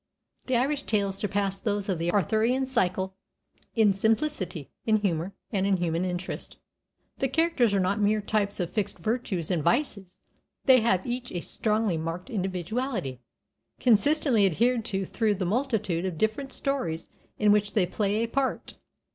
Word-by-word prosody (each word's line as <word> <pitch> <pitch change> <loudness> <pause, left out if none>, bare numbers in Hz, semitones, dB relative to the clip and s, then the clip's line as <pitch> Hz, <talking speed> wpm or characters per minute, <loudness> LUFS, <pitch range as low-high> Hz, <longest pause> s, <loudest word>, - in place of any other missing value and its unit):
'" - - -31
The 255 -2 +2
Irish 280 +4 +1
tales 200 -5 0
surpass 200 -1 -1
those 205 -2 -1
of 185 -4 -1
the 170 +1 0
Arthurian 220 - +2
cycle 190 -7 0 0.6
in 215 -4 +5
simplicity, 205 - -1
in 220 - +3
humor, 190 -2 -1 0.2
and 195 -3 +1
in 195 -1 +3
human 170 0 0
interest; 180 0 -5 0.6
the 270 - +2
characters 290 -5 +2
are 200 - +2
not 190 +3 +1
mere 210 +1 +3
types 205 -1 -1
of 175 -2 -2
fixed 210 -4 -2
virtues 190 -3 -2
and 170 -4 +1
vices, 200 - 0 0.5
they 260 -3 +7
have 190 -5 +2
each 245 0 -4
a 175 - -2
strongly 215 -4 0
marked 165 +8 -5
individuality, 190 - -2 0.6
consistently 245 -1 +4
adhered 230 +7 +2
to 195 -3 -1
through 215 +1 0
the 185 -1 -2
multitude 210 -5 0
of 185 -4 -3
different 220 - -1
stories 250 - -2 0.3
in 210 -1 +4
which 205 0 +2
they 200 -4 +3
play 205 +4 0
a - - -1
part. 270 +3 -2
205 Hz, 160 wpm, -27 LUFS, 185-235 Hz, 0.6 s, they